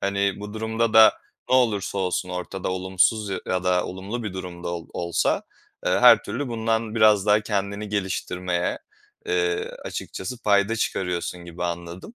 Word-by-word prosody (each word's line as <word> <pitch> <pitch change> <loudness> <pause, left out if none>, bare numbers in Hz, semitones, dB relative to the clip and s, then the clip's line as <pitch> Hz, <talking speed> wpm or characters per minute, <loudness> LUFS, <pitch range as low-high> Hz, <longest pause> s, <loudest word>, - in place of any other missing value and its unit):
Hani, 100 0 0
bu 105 +1 -7
durumda 110 +1 -1
da 110 0 +8 0.4
ne - - +3
olursa 105 -6 +2
olsun 90 0 -1
ortada 90 +1 -4
olumsuz 95 +3 +1
ya 95 - -2
ya 90 0 -1
da 90 -1 +2
olumlu 100 +6 -5
bir 105 -4 -4
durum 90 -2 -7
da - - -2
ol 85 -1 -5
olsa, 85 -1 0 0.4
eee, - - +3
her - - +7
türlü 125 +7 -4
bundan 115 -1 -1
biraz 105 -3 +5
daha 105 0 +5
kendini 100 0 -3
geliştirmeye, 90 -3 -2 0.5
eee, 430 +2 0 0.2
açıkçası 125 -1 -6
payda 100 +2 +3
çıkarıyorsun 90 -4 -2
gibi 85 +1 -6
anladım. 85 - -6
100 Hz, 160 wpm, -24 LUFS, 90-110 Hz, 0.5 s, da